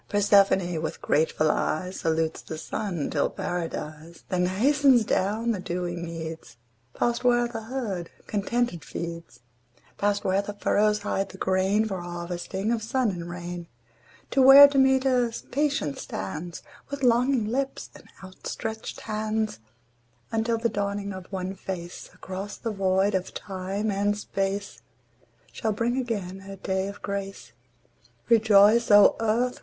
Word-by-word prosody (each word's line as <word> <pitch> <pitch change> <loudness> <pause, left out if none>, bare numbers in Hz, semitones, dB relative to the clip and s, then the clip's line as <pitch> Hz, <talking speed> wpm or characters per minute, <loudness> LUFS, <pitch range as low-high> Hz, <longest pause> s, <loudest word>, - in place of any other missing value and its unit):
Persephone 195 -4 +3
with 160 - -4
grateful 155 0 +2
eyes 180 +4 -2
Salutes 160 0 0
the 160 - -7
Sun—'tis 170 0 -2
Paradise: 165 -1 -5
Then 180 -1 +1
hastens 255 +4 +4
down 215 +6 0
the 210 - -2
dewy 175 -1 -3
meads, 165 -6 -7 0.4
Past 240 +1 0
where 240 -1 +3
the 230 -1 -6
herd 220 -8 -4 0.2
contented 215 -2 -1
feeds, 170 -3 -7 0.6
Past 205 0 +1
where 190 +1 +2
the 205 +1 -6
furrows 210 +1 +2
hide 195 0 -1
the 190 - -11
grain, 190 +3 +2
For 190 -4 -4
harvesting 175 +4 -4
of 235 -2 0
sun 240 0 0
and 175 -2 -6
rain; 175 0 -6 0.6
To 270 - +3
where 270 +2 +11
Demeter 265 -3 +3 0.2
patient 280 - 0
stands 155 - -6 0.3
With 280 -1 -5
longing 245 0 +3
lips 270 +5 -3
and - - -15 0.2
outstretched 220 +4 -6
hands, 215 - -2 0.7
Until 225 +1 0
the 230 +1 +1
dawning 200 -1 -3
of 185 0 -10
one 190 -1 -3
face 180 -2 -7
Across 195 +2 -6
the 230 - -3
void 195 0 +1
of 185 -1 -2
time 195 +2 -3
and 205 +1 0
space 200 0 -3 0.7
Shall 220 -1 -2
bring 235 +4 0
again 205 -7 -3
her 195 0 -9
day 190 0 -2
of 200 +1 -9
grace. 200 -1 -5 0.8
Rejoice, 220 0 +5
O 205 -1 +7
Earth! 230 +3 0
200 Hz, 135 wpm, -26 LUFS, 180-225 Hz, 0.8 s, where